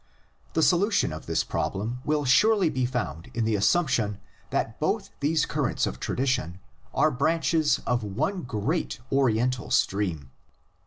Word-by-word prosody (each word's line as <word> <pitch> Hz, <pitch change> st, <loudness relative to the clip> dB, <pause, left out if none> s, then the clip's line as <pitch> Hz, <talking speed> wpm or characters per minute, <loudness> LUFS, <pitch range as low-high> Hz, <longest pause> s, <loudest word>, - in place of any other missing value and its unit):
The 160 Hz, -, +2 dB
solution 190 Hz, -, +3 dB
of 80 Hz, -, -8 dB
this -, -, +1 dB
prob -, -, -2 dB
lem 110 Hz, +6 st, -3 dB
will 150 Hz, -1 st, 0 dB
surely 195 Hz, -, +4 dB
be 130 Hz, -3 st, 0 dB
found 85 Hz, -, -4 dB
in 115 Hz, -1 st, 0 dB
the 110 Hz, -1 st, +1 dB
assumption 110 Hz, -, +2 dB, 0.3 s
that -, -, -2 dB
both -, -, -1 dB
these 150 Hz, +2 st, +2 dB
currents -, -, 0 dB
of -, -, -5 dB
tradition 120 Hz, -, -1 dB, 0.3 s
are 155 Hz, -, +3 dB
branches 160 Hz, +3 st, +2 dB
of 125 Hz, -2 st, 0 dB
one 150 Hz, -, -2 dB
great 125 Hz, -, -2 dB
Oriental 125 Hz, -2 st, +1 dB
stream. 85 Hz, -10 st, 0 dB
130 Hz, 145 wpm, -26 LUFS, 105-155 Hz, 0.3 s, surely